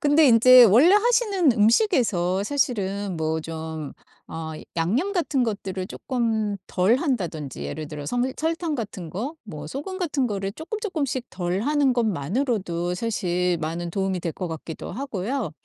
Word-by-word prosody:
근데 300 0 +5
인제 250 +1 +8
원래 245 - +6
하시는 415 - +3
음식에서 215 - +2
사실은 205 -7 -1
뭐 160 0 -1
좀 160 -2 -6 0.4
어 160 -1 -5 0.2
양념 230 - 0
같은 315 -8 0
것들을 195 -4 -3
조금 225 -6 -1
덜 190 +5 +3
한다든지 175 - -2
예를 150 - -5
들어서 150 -2 -7
섬 245 +9 0
설탕 325 -1 -1
같은 195 -8 -6
거 240 - -4
뭐 150 -9 -8
소금 295 - -5
같은 290 -8 0
거를 195 -1 -3
쪼끔쪼끔씩 320 - -3
덜 180 +1 -2
하는 285 0 +2
것만으로도 195 - -1
사실 180 -4 -1
많은 165 +2 -3
도움이 190 0 -1
될 170 - -2
것 180 - -5
같기도 160 0 -7
하고요. 250 +1 -3
210 Hz, 305 characters per minute, -24 LUFS, 175-275 Hz, 0.4 s, 인제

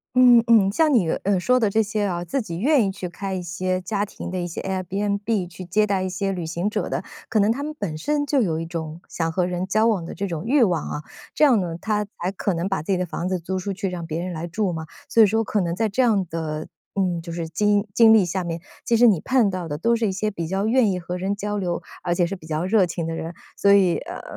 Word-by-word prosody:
嗯 245 -2 +7
嗯。 215 -4 +5
像 310 +8 +3
你， 205 -9 +3 0.2
呃， 195 -1 +2
说 250 +7 +3
的 220 -4 +2
这 220 +2 +2
些 210 0 -2
啊， 175 -2 -2
自 275 +9 -1
己 170 -7 -6
愿 275 +3 +4
意 195 - -1
去 190 -1 -6
开 195 +2 -5
一 185 - -3
些 185 +2 -2
家 200 +2 -1
庭 190 - -8
的 185 - -2
一 175 - -2
些 170 - -6
Airbnb 200 +2 -1
去 180 +1 -10
接 205 +4 +2
待 195 -2 0
一 185 - -2
些 195 +2 -2
旅 180 -3 -4
行 170 +5 -2
者 - - -2
的， - - -2 0.3
可 220 - +2
能 205 +2 +4
他 255 +5 -2
们 305 +1 -5
本 165 -7 -3
身 290 - 0
就 280 -2 +2
有 165 -7 0
一 165 - -4
种 165 -1 -6
想 165 -1 -2
和 180 +2 +1
人 180 +1 -2
交 215 +3 +2
往 195 -7 +1
的 - - -7
这 200 - -2
种 170 -2 -4
欲 265 +2 +4
望 175 -8 +1
啊。 150 - -4 0.3
这 305 - +5
样 255 -7 +5
呢， 170 -2 -3
他 210 +2 -1
才 185 -2 -5
可 195 0 -1
能 170 +3 -1
把 195 -5 -1
自 165 - -3
己 190 - +2
的 180 - -1
房 175 +2 -4
子 185 - 0
租 185 +3 -3
出 200 +2 -3
去， 195 0 -3
让 175 -2 -5
别 165 +2 -3
人 180 0 -4
来 165 +1 -4
住 185 +1 -1
嘛。 160 -1 -5 0.2
所 230 - +4
以 - - +9
说 225 +3 +1
可 210 -1 0
能 170 -1 -1
在 220 +4 +1
这 230 +6 +1
样 215 -6 +3
的， 155 -1 -4 0.3
嗯， 180 -4 0
就 170 0 -8
是 165 -1 -4
经 205 +5 +1
经 225 -1 +7
历 220 -4 +6
下 180 +1 -2
面， 170 -1 -4 0.2
其 230 - +2
实 240 - +6
你 205 -8 +5
看 250 -6 +3
到 185 -2 -4
的 145 -1 -4
都 230 +9 +2
是 230 -1 0
一 - - 0
些 210 +3 -1
比 170 -4 -4
较 195 +4 -1
愿 230 -2 +3
意 180 - -2
和 175 +1 -5
人 190 +2 -1
交 205 +1 -3
流， 175 -2 -2 0.2
而 175 -1 0
且 175 - +2
是 175 - -3
比 160 -4 -13
较 155 +2 -1
热 190 -2 +3
情 170 -1 -3
的 165 - -3
人。 165 +1 -5 0.2
所 200 - +3
以， 190 -4 +4
呃， - - -7
190 Hz, 315 characters per minute, -23 LUFS, 175-215 Hz, 0.3 s, 以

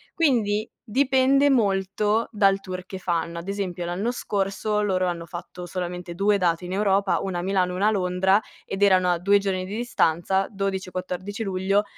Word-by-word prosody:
Quindi 225 -9 +2 0.2
dipende 270 +3 +3
molto, 205 -1 +1
dal 195 -2 +3
tour 185 -1 -6
che 190 - -6
fanno. 170 -1 -2
Ad 170 - -7
esempio, 185 -3 -3
l'anno 185 +7 -2
scorso 205 -1 -1
loro 185 -3 +1
hanno 170 -1 -3
fatto 175 0 -8
solamente 180 -1 -5
2 200 +2 +3
date 175 -1 +1
in 180 - -6
Europa, 200 -1 +2
una 185 -2 -3
a - - -2
Milano 185 -2 +1
e - - -4
una 200 +3 +2
a - - +4
Londra, 190 0 +2 0.2
ed 195 +1 -5
erano 185 -2 +5
a 175 - 0
2 200 +3 +4
giorni 190 -2 -2
di 195 +3 -6
distanza, 190 -5 +1
12 195 -2 -3
e - - -18
14 185 +4 -4
luglio. 195 +1 +1
195 Hz, 185 wpm, -24 LUFS, 180-205 Hz, 0.2 s, erano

